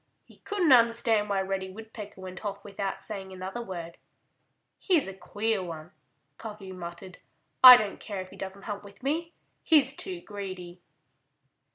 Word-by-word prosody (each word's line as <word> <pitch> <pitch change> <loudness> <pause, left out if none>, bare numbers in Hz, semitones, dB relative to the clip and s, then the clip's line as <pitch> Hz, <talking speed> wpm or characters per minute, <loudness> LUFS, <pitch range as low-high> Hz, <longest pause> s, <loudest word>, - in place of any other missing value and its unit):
He - - -19
couldn't 380 -7 0
understand 230 -3 +4
why 195 -1 +1
Reddy 190 0 -3
Woodpecker 210 0 -10
went 185 +1 -8
off 200 -1 -5
without 200 -1 -4
saying 195 -3 -6
another 190 +5 -6
word. 170 -6 -7 0.8
"He's 345 - +2
a 195 - -6
queer 205 +3 -2
one," 165 -1 -8 0.5
Cuffy 210 -4 -8
muttered. 180 +1 -9 0.4
"I 250 -1 +14
don't 210 -3 -3
care 200 -3 -6
if 185 0 -7
he - - -12
doesn't 195 +1 -7
hunt 205 -1 -5
with 200 +2 -15
me. 330 +5 -2 0.3
He's 280 -3 +4
too 370 +2 -1
greedy." 185 - -8
200 Hz, 155 wpm, -28 LUFS, 190-230 Hz, 0.8 s, I